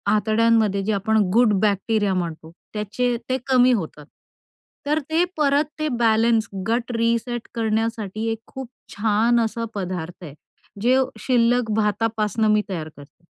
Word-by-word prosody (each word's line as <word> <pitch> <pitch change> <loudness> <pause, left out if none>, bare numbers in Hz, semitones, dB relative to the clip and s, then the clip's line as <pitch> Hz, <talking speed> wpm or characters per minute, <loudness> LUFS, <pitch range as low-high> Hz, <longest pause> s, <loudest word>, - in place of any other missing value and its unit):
आतड्यांमध्ये 215 -1 +2
जे 215 - -1
आपण 220 +3 +1 0.2
गुड 230 -1 +4
बॅक्टेरिया 205 0 +1
म्हणतो. 165 -3 -4 0.2
त्याचे 220 +4 -1
ते 260 - +1
कमी 255 -1 +5
होतात. 160 -8 -4 0.8
तर 300 +2 +1
ते 325 +2 +3
परत 290 0 +2
ते 310 - 0
बॅलन्स, 225 -1 +3 0.2
गट 235 +2 -1
रीसेट 235 +1 -1
करण्यासाठी 220 -2 -2
एक 225 - -4
खूप 265 -1 -8 0.3
छान 220 +3 +2
असा 230 0 -1
पदार्थ 180 -2 -5
आहे. 150 -5 -9 0.5
जे 250 +3 +4 0.2
शिल्लक 240 -1 +2
भातापासनं 215 0 0
मी 210 - +3
तयार 160 -5 -4
करते. 145 +4 -16
220 Hz, 135 wpm, -22 LUFS, 205-235 Hz, 0.8 s, कमी